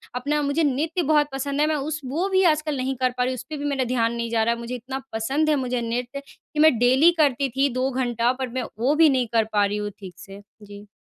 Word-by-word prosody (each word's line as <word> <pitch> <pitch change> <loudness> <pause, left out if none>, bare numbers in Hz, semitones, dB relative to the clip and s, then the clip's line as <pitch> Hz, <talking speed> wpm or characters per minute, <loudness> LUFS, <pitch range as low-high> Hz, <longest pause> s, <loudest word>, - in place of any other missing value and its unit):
अपना 290 +4 -1
मुझे 285 +3 0
नृत्य 310 +5 0
बहुत 300 -1 +3
पसंद 280 +1 -2
है, 300 - +3
मैं 310 - 0
उस 300 +2 -3
वो 315 +9 -1
भी 380 0 +3
आजकल 305 -1 -2
नहीं 260 +1 -2
कर 255 0 +1
पा 250 - +1
रही, 255 +1 -1
उसपे 300 +5 -7
भी 290 - -5
मेरा 280 -2 0
ध्यान 235 -2 0
नहीं 235 0 -3
जा 225 -1 +2
रहा। 235 +1 +1
मुझे 235 +1 -6
इतना 260 +2 -6
पसंद 270 +8 0
है 305 - +3
मुझे 250 -3 -2
नृत्य, 245 +4 -3
कि 300 - -10
मैं 310 -5 +5
डेली 260 +7 +5
करती 280 -3 +2
थी 275 +1 +3
2 255 +1 0
घंटा 240 -2 0
पर 260 -1 -3
मैं - - -2 0.2
वो 265 +6 +2
भी 320 0 +6
नहीं 255 -3 +1
कर 225 -1 +4
पा 205 -1 +3
रही 205 +1 -2
हूँ 210 0 -3
ठीक 190 -3 -10
से। 195 +2 -11 0.2
जी। 205 0 -12
260 Hz, 255 wpm, -23 LUFS, 235-295 Hz, 0.2 s, भी